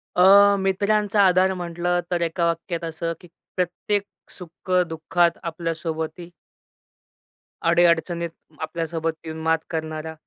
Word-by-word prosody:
अ, 200 Hz, +2 st, +7 dB
मित्रांचा 205 Hz, +2 st, +1 dB
आधार 185 Hz, +1 st, +4 dB
म्हटलं 175 Hz, 0 st, -1 dB
तर 175 Hz, -1 st, 0 dB
एका 170 Hz, +1 st, 0 dB
वाक्यात 170 Hz, 0 st, -2 dB
असं 165 Hz, +1 st, -3 dB
की 175 Hz, -, -14 dB, 0.3 s
प्रत्येक 195 Hz, +3 st, -1 dB, 0.3 s
सुख-दुःखात 175 Hz, -1 st, 0 dB
आपल्या 165 Hz, 0 st, -3 dB
सोबती. 160 Hz, +2 st, -5 dB, 1.4 s
अडी-अडचणीत 170 Hz, 0 st, +2 dB, 0.3 s
आपल्यासोबत 165 Hz, 0 st, -2 dB
येऊन 160 Hz, 0 st, -6 dB
मात 160 Hz, 0 st, +2 dB
करणारा. 160 Hz, -1 st, -4 dB
170 Hz, 105 wpm, -23 LUFS, 165-180 Hz, 1.4 s, अ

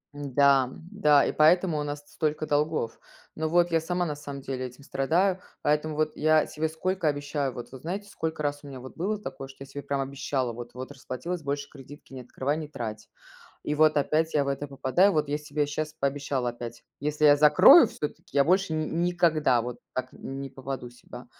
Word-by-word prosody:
М-да, 140 Hz, -2 st, +3 dB
м-да, 160 Hz, 0 st, +2 dB
и -, -, 0 dB
поэтому 165 Hz, +1 st, +4 dB
у 150 Hz, -, -1 dB
нас 145 Hz, 0 st, -4 dB
с -, -, -21 dB
столько 155 Hz, 0 st, -1 dB
долгов. 150 Hz, -5 st, 0 dB, 0.4 s
Но 160 Hz, 0 st, -2 dB
вот 175 Hz, 0 st, +3 dB
я 165 Hz, -, +3 dB
сама 175 Hz, +2 st, -1 dB
на 150 Hz, -2 st, -3 dB
самом 140 Hz, -1 st, -8 dB
деле 130 Hz, -1 st, -4 dB
этим 125 Hz, +3 st, -10 dB
страдаю, 180 Hz, +8 st, +1 dB, 0.2 s
поэтому 150 Hz, +1 st, 0 dB
вот 155 Hz, 0 st, 0 dB
я 155 Hz, 0 st, +3 dB
себе 160 Hz, +1 st, -2 dB
сколько 185 Hz, +2 st, -1 dB
обещаю. 145 Hz, -2 st, -1 dB
Вот 120 Hz, -, -8 dB
вы 130 Hz, -, -8 dB
знаете, 195 Hz, +8 st, -5 dB
сколько 160 Hz, -1 st, -4 dB
раз 145 Hz, -1 st, -2 dB
у 145 Hz, -, -10 dB
меня 135 Hz, -2 st, -8 dB
вот 130 Hz, +1 st, -11 dB
было 205 Hz, +5 st, -2 dB
такое, 135 Hz, -, -7 dB
что 135 Hz, -, -15 dB
я 135 Hz, -, -8 dB
себе 145 Hz, +1 st, -7 dB
прям 140 Hz, -1 st, -2 dB
обещала, 135 Hz, -2 st, -2 dB
вот 120 Hz, +1 st, -9 dB
вот 130 Hz, +2 st, -7 dB
расплатилась, 145 Hz, +5 st, -5 dB
больше 140 Hz, 0 st, -3 dB
кредитки 140 Hz, 0 st, -13 dB
не 130 Hz, -, -7 dB
открывай, 130 Hz, +4 st, -2 dB
не 155 Hz, -2 st, -5 dB
трать. 110 Hz, -6 st, -6 dB, 0.5 s
И 150 Hz, -, -2 dB
вот 155 Hz, 0 st, +4 dB
опять 155 Hz, +3 st, +1 dB
я 145 Hz, -, +3 dB
в -, -, -3 dB
это 140 Hz, +1 st, -2 dB
попадаю, 140 Hz, +8 st, +2 dB
вот 150 Hz, -2 st, 0 dB
я 145 Hz, +1 st, -1 dB
себе 150 Hz, -1 st, -2 dB
щас 150 Hz, +1 st, -4 dB
пообещала 140 Hz, -3 st, -1 dB
опять, 120 Hz, -1 st, -8 dB, 0.2 s
если 150 Hz, +1 st, -1 dB
я 145 Hz, -1 st, +8 dB
закрою 180 Hz, -, +8 dB
всё-таки, 150 Hz, -1 st, -6 dB
я 140 Hz, -, +6 dB
больше 185 Hz, +1 st, +2 dB
ни 155 Hz, 0 st, 0 dB, 0.2 s
никогда 155 Hz, -8 st, +2 dB
вот 120 Hz, 0 st, -6 dB, 0.2 s
так 130 Hz, 0 st, -3 dB
не 135 Hz, 0 st, -7 dB
попаду 130 Hz, -2 st, -6 dB
себя, 125 Hz, -, -12 dB
145 Hz, 210 wpm, -27 LUFS, 135-155 Hz, 0.5 s, я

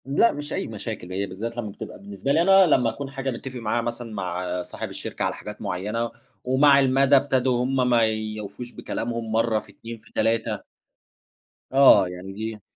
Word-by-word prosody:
لأ، 140 Hz, -, +4 dB
مش 145 Hz, +1 st, -5 dB
أي -, -, -2 dB
مشاكل 110 Hz, -4 st, -6 dB
هي 100 Hz, +1 st, -1 dB
بالذَّات 110 Hz, +5 st, -6 dB
لما 115 Hz, -3 st, -3 dB
بتبقى -, -, -9 dB
بالنسبة 100 Hz, +6 st, -4 dB
لي 160 Hz, +3 st, +4 dB
أنا، 195 Hz, +2 st, +7 dB
لمّا 125 Hz, -8 st, +3 dB
أكون 135 Hz, +5 st, -6 dB
حاجة 135 Hz, -1 st, -3 dB
مِتَّفِق 130 Hz, +1 st, -7 dB
معاها 115 Hz, +1 st, 0 dB
مثلًا 120 Hz, -1 st, -5 dB
مع 90 Hz, -2 st, -3 dB
صاحب -, -, -6 dB
الشركة -, -, -5 dB
على -, -, -1 dB
حاجات -, -, -9 dB
مُعيّنة، 105 Hz, +6 st, -2 dB, 0.3 s
ومع 140 Hz, +2 st, +5 dB
المدى 135 Hz, +1 st, +4 dB
ابتدوا 130 Hz, -2 st, +2 dB
هُم 130 Hz, -1 st, +1 dB
ما 120 Hz, -1 st, +4 dB
يوفوش 110 Hz, +1 st, -4 dB
بكلامهم، 115 Hz, -2 st, -4 dB
مرة 115 Hz, 0 st, +2 dB
في -, -, -15 dB
2، 115 Hz, 0 st, -9 dB
في 110 Hz, +1 st, -22 dB
3 115 Hz, -2 st, 0 dB, 1.1 s
آه، 135 Hz, -8 st, +7 dB
يعني 90 Hz, +2 st, -8 dB
دي 110 Hz, +1 st, -5 dB
115 Hz, 180 wpm, -24 LUFS, 105-130 Hz, 1.1 s, أنا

